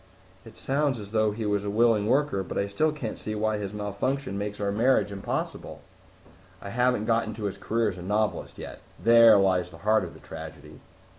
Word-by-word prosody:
'" 95 +1 -28
"It 115 - -14
sounds 140 -2 0
as 100 -1 -9
though 110 -1 +2
he 110 +1 -4
was 105 -1 0
a 100 - -3
willing 110 -1 +3
worker, 130 -5 +1
but 95 - -6
I 100 - +1
still 125 +11 0
can't 140 -7 -6
see 110 - -4
why 110 0 0
his 100 -2 -4
malfunction 105 +4 -3
makes 105 +1 -4
our 100 -1 -1
marriage 110 -1 +2
impossible." 100 -1 -4 0.8
"I 100 - -8
haven't 125 -2 +1
gotten 115 -1 0
to 110 - -7
his 100 -1 -3
career 115 +1 0
as 95 -2 -7
a - - -7
novelist 105 +4 -1
yet. - - -8 0.2
There 115 -1 +7
lies 95 -2 +2
the 80 - -13
heart 110 +1 +4
of - - -8
the - - -13
tragedy." 75 -2 -10
105 Hz, 210 wpm, -26 LUFS, 100-115 Hz, 0.8 s, There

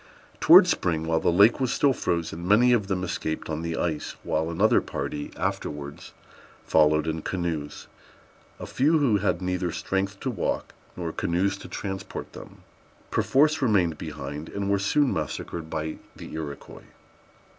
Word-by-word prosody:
Towards - - +8
spring, 80 -2 0
while 80 0 +1
the - - +2
lake 100 +9 +5
was 130 -2 0
still 140 -2 +3
frozen, 85 -4 -2
many 120 +5 +5
of 105 -5 +1
them 95 -2 -1
escaped 80 -3 -3
on 80 0 -3
the 85 -1 -3
ice, 80 -3 -2
while 80 +1 -1
another 95 +6 +3
party 75 0 -4
afterwards 70 -1 -4 0.5
followed 75 0 +3
in 80 0 -2
canoes. 80 -5 -4 0.7
A - - -6
few, 150 +5 +2
who 130 -9 +3
had 95 -2 -1
neither 90 -1 -1
strength 95 +3 -2
to 130 - -1
walk 115 - -2 0.2
nor 85 -2 -3
canoes 95 +5 0
to - - -9
transport 95 -1 -6
them, - - -12 0.5
perforce 150 +3 +3
remained 95 - +2
behind, 75 +3 -6
and 100 0 -2
were 100 - +2
soon 135 +8 +2
massacred 80 +1 -4
by 80 0 -3 0.2
the - - -10
Iroquois. 75 -3 -7
85 Hz, 155 wpm, -26 LUFS, 80-100 Hz, 0.7 s, Towards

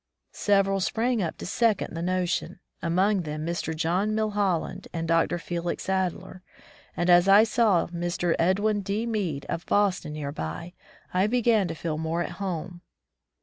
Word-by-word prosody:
Several 195 -1 +2
sprang 230 +4 0
up 165 -4 -3
to - - -7
second 220 -1 +1
the 165 - -4
motion, 180 0 -1 0.2
among 190 +4 +2
them 155 -1 -5
Mr. 170 -1 -2
John 180 +7 0
Mil 215 -1 0
hoUand 195 -5 -1
and 165 -1 -3
Dr. 165 +1 +2
Felix 170 0 -4
Adler, 190 -1 -2 0.6
and 175 - 0
as 175 +1 +6
I 200 +2 +8
saw 220 -5 +3
Mr. 175 0 -1
Edwin 205 +4 +2
D. 200 +3 -2
Mead 195 -11 -2
of 170 - -3
Boston 190 -6 +1
near 145 -2 -4
by, 115 - -6 0.4
I 185 +3 +3
began 225 -4 +2
to 165 - -5
feel 155 -1 -3
more 160 +2 -1
at - - -6
home. 180 -2 -4
180 Hz, 160 wpm, -26 LUFS, 170-205 Hz, 0.6 s, I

